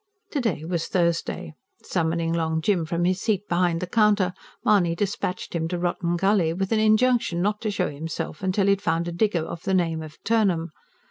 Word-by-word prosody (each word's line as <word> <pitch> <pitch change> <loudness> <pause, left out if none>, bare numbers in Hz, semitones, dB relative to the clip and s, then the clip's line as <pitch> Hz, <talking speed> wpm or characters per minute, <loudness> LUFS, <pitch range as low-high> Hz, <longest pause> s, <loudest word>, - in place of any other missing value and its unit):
To 285 - -1
day 180 -10 -1
was 170 -1 -2
Thursday. 170 - -1 0.3
Summoning 165 0 0
Long 160 -1 0
Jim 170 -1 +1
from 170 +1 0
his 185 +1 +1
seat 205 -3 0
behind 175 -1 +1
the - - -1
counter, 205 -2 +3 0.3
Mahony 190 -7 +3
dispatched 190 -1 -3
him 165 -1 -1
to 175 +1 -2
Rotten 175 0 -1
Gully, 195 -3 +2
with 195 +3 -2
an 220 - +3
injunction 220 -3 +3
not 205 +3 0
to 220 - -1
show 200 -3 0
himself 155 +2 -5
till 195 +1 +1
he 200 - +4
had 200 0 +1
found 165 +1 0
a - - -2
digger 170 -2 0
of 165 - -7
the 190 - 0
name 165 -3 +1
of 155 -1 -10
Turnham. 190 -8 +1
180 Hz, 200 wpm, -24 LUFS, 165-205 Hz, 0.3 s, he